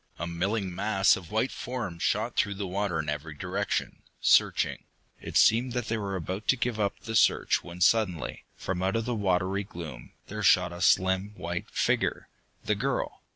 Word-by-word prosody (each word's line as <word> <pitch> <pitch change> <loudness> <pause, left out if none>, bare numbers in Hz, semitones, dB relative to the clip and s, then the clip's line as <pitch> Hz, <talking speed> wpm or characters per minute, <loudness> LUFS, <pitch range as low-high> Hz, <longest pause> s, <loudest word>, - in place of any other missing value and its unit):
A 85 - -3
milling 95 +3 -2
mass 95 +1 +3
of 90 -3 -9
white 110 +5 0
forms 105 -10 -5
shot 110 +3 0
through 100 -4 +1
the 100 0 -4
water 95 -1 -1
in 80 -1 -2
every 75 +1 -4
direction, 95 +6 -2 0.2
searching. - - +3 0.4
It - - -2
seemed 120 +3 +4
that 125 -2 -3
they 115 - 0
were 100 -2 -3
about 95 +4 -4
to - - +5
give 120 -3 -2
up 100 -1 -1
the 115 -1 -5
search - - +3
when 90 0 -10
suddenly, 90 -7 +1
from 90 -1 -3
out 95 +2 0
of 115 -1 0
the 125 - -1
watery 95 -1 0
gloom, 80 -10 -9
there - - -6
shot - - +4
a 85 - -8
slim 95 +3 +2
white 85 -1 -4
figure - - 0 0.4
the - - +2
girl! - - -2
95 Hz, 185 wpm, -28 LUFS, 90-110 Hz, 0.4 s, to